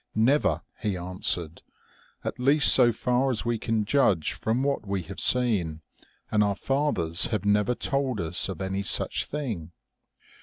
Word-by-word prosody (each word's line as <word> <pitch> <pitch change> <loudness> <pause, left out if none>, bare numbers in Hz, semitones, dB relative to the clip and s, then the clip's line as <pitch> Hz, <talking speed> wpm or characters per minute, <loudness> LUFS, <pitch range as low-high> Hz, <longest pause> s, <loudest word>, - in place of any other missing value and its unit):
4 110 - +2
Never,' 140 +5 +2 0.2
he 105 -4 -2
answered, 90 -2 -2 0.3
' - - -33
at - - -4
least 140 +3 +5
so 120 -2 +6
far 125 +3 0
as 120 -2 -2
we 120 -1 -1
can 110 -2 -1
judge 100 - +1
from 115 +4 -2
what 140 -6 -2
we 95 -2 -2
have 95 +4 -10
seen, 100 -11 +2 0.5
and 105 -1 +3
our 100 -1 0
fathers 120 - 0
have 105 -4 -3
never 105 +4 +1
told 135 -4 -2
us 85 +2 +2
of 95 - -6
any 95 +1 -3
such 100 - +1
thing.' 115 - -5
105 Hz, 165 wpm, -26 LUFS, 95-125 Hz, 0.5 s, so